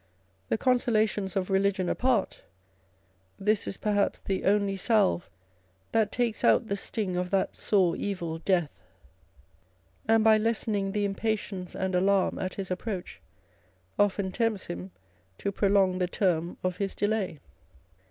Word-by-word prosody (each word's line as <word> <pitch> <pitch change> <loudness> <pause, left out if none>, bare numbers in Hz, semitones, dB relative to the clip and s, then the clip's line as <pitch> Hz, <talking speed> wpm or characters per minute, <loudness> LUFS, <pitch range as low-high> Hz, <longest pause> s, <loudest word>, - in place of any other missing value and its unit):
The - - +1
consolations 215 -6 +1
of 195 0 -1
religion 195 -1 +2
apart, 245 -3 0 1.0
this 210 +1 +1
is - - -3
perhaps 205 -1 0
the 190 -1 -3
only 200 0 +2
salve 190 - +2 0.6
that 220 -2 +2
takes 240 -3 -1
out - - +4
the 200 - -1
sting 200 -2 -3
of 180 0 -1
that 195 0 0
sore 185 -5 +2
evil, 170 -5 -3
Death; 175 -4 +1 1.4
and 225 0 +4
by 220 -1 +6
lessening 215 -3 0
the 205 0 0
impatience 200 -2 -3
and 190 0 -2
alarm 190 +1 +2
at 185 0 -3
his 190 -2 -5
approach 185 0 -4 0.8
often 200 -1 +2
tempts 225 -2 -1
him 90 +2 -6 0.5
to 200 - -2
prolong 195 -2 +2
the 180 - +1
term 175 -3 0
of 185 -1 -1
his 195 -1 -3
delay. 205 -6 -1
195 Hz, 135 wpm, -28 LUFS, 185-215 Hz, 1.4 s, by